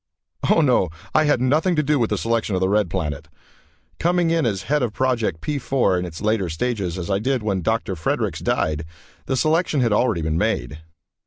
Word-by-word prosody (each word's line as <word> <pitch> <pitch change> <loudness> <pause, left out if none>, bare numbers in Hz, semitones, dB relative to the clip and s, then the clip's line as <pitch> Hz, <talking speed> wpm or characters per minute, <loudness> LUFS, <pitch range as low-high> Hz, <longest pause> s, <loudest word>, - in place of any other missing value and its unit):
Oh, 165 - +5
no, 125 - +3 0.2
I 155 - +4
had 145 -4 +3
nothing 155 +8 +2
to 150 - +2
do 150 0 +1
with 115 - +1
the - - 0
selection 115 -3 0
of - - +1
the 95 - +1
Red 105 -2 +2
Planet. 75 -5 -3 0.7
Coming 175 -1 +2
in 165 -6 +2
as 100 -4 -2
head 150 0 0
of 120 -4 -1
Project 120 -11 0
P 150 -2 -2
4 125 -8 +1
in 90 - -3
its 85 +2 -8
latter 105 -4 +1
stages, 95 0 -2
as 90 +2 -4
I 95 - +2
did 130 +1 -1
when 100 -3 -1
Dr. 110 +1 -1
Fredericks 80 - -1
died, 75 0 0 0.4
the 130 - 0
selection 155 +1 +1
had 115 -4 +2
already 105 -6 +1
been 80 +1 0
made. 75 +3 -1
110 Hz, 210 wpm, -22 LUFS, 90-135 Hz, 0.7 s, Oh